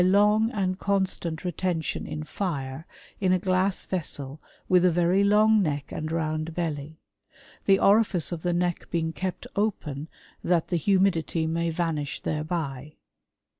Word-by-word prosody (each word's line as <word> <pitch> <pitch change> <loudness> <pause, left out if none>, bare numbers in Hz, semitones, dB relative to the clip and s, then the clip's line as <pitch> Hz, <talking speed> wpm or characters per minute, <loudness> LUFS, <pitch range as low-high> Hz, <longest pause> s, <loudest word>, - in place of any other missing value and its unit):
129 190 +2 +5 0.4
long^ 195 - +1
and 185 0 -3
constant 190 -4 -1
retention 175 -2 -2
in 155 - -4
fire, 145 -4 -4 0.3
in 185 -2 +2
a 185 - +4
glass 185 +1 0
vessel 145 -5 -3 0.3
with 180 -1 +4
a 180 - +6
very 175 +3 +3
long 215 +1 +5
neck 145 -5 -2
and 155 +1 -4
round 155 0 -2
belly; 155 -2 -3 0.7
the 195 -1 +6
orifice 200 -6 +3
of 170 -2 -4
the 175 - 0
neck 175 0 -1
being 165 -1 -1
kept 185 +1 -4
open, 160 -9 -2 0.4
that 170 -2 +1
the 175 - +1
humidity 175 -2 +2
may 165 +1 0
va 165 0 0
nish 150 -2 -4
tiiereby." 150 -3 -3
170 Hz, 150 wpm, -26 LUFS, 155-185 Hz, 0.7 s, a